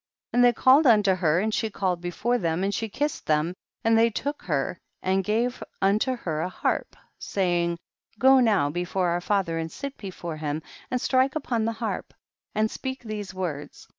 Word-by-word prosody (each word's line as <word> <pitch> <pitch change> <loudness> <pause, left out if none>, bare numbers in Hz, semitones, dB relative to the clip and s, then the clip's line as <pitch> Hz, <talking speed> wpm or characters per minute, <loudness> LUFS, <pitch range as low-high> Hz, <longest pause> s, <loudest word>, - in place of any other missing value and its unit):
And 245 - +5
they 245 - +7
called 265 +5 +5
unto 210 -5 +5
her 170 -3 +2
and 215 +3 0
she 220 - 0
came 185 -4 -1
before 215 +8 -1
them, 165 0 0
and 200 +1 0
she 225 +2 -2
kiss 295 +8 -2
ed - - -38
them, 155 +3 +2 0.3
and 225 -1 +4
they 230 +1 +5
took 285 +7 -3
her 150 +1 -1 0.2
and 190 +1 +1
gave 230 +5 0 0.2
unto 210 +7 +2
her 160 -10 -3
a 180 - -1
harp, - - -2 0.2
saying, 175 -3 0 0.4
go 265 +3 +6
now 205 - +3
be 175 +3 -2
fore 180 0 0
our 175 +1 0
father, 185 -4 0
and 160 0 -4
sit 280 -1 -6
before 175 -5 -6
him, 155 0 -3 0.3
and 250 - 0
strike 260 +2 +2
upon 240 -7 -1
the 230 - 0
harp, 225 0 -4 0.4
and 215 0 +1
speak 260 -1 -5
these 210 -3 -5
words. 160 -6 -5
200 Hz, 195 wpm, -26 LUFS, 175-235 Hz, 0.4 s, they